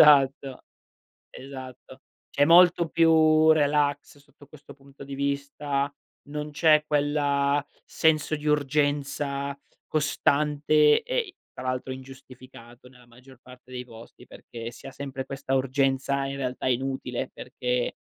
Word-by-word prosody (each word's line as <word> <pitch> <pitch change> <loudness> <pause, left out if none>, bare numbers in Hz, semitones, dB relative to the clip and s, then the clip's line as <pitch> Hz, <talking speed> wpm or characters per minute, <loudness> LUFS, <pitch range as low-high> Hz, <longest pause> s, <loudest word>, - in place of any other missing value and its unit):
esatto. 140 -3 +4 0.7
Esatto. 130 -1 -11 0.3
C'è 145 - +3
molto 170 +1 +6
più 160 -1 +4
relax 145 -1 0
sotto 145 0 -20
questo 145 0 -15
punto 140 0 -16
di 140 0 -7
vista. 140 0 -2 0.4
Non 150 +1 -5
c'è 155 0 +4
quella 145 -1 +1 0.2
senso 155 -1 +1
di 150 +1 -9
urgenza 145 -1 -1 0.3
costante 150 0 +2
e - - -2
i 395 -6 -3 0.2
tra - - -8
l'altro 130 0 -3
ingiustificato 130 -2 -13
nella 125 -1 -20
maggior 125 +2 -18
parte 125 0 -16
dei 125 -1 -6
posti, 115 -1 -14
perché 115 0 -9
si - - -13
ha - - -8
sempre 135 -1 -6
questa 135 0 -4
urgenza 135 +1 0
in 135 0 -5
realtà 130 -2 -4
inutile, 130 -1 -2
perché 125 -1 -3
140 Hz, 125 wpm, -26 LUFS, 130-150 Hz, 0.7 s, molto